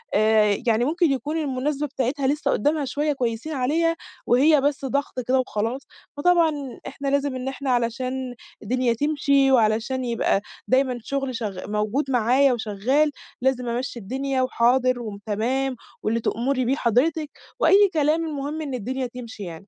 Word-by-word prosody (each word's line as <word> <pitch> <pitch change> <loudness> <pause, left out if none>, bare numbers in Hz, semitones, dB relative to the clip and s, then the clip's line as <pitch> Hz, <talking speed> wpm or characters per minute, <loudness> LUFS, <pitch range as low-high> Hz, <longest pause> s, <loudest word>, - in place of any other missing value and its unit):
آآ، 215 -1 +4
يعني 230 +1 +3
ممكن 330 +2 +2
يكون 290 +4 -2
المناسبة 290 0 -1
بتاعتها 265 0 -1
لسّه 290 +2 0
قدامها 295 +5 +1
شوية 295 +3 -1
كويسين 250 +3 -3
عليها، 315 +5 +1 0.3
وهي 280 +4 +5
بس 280 -1 0
ضغط 280 0 -2
كده 260 +1 +3
وخلاص، 235 +1 -2 0.4
فطبعًا 310 -5 +1
إحنا 280 - -6
لازم 280 -1 0
إن 255 0 -4
إحنا 270 0 -4
علشان 250 +2 -1 0.3
الدنيا 245 +2 +1
تمشي، 280 +1 +2
وعلشان 235 +2 +2
يبقى 230 -4 +1 0.3
دايمًا 255 -1 +2
شغل 270 0 -2
شغ 205 -5 -5
موجود 215 +7 -1
معايا 250 +3 +4
وشغّال 240 +7 +1 0.3
لازم 255 -1 0
أمشّي 245 +1 -3
الدنيا، 265 +5 -2
"وحاضر 255 0 +2
وتمام 225 +5 -2 0.3
واللي 225 +2 +1
تؤمري 255 +3 0
بيه 260 +3 +2
حضرتِك." 295 +5 +1 0.3
وأي 405 0 +6
كلام 310 +1 +2
المهم 300 0 -4
إن 285 -3 -4
الدنيا 255 +3 -3
تمشي 235 -4 -9
يعني. 170 +1 -9
260 Hz, 145 wpm, -24 LUFS, 235-285 Hz, 0.4 s, وأي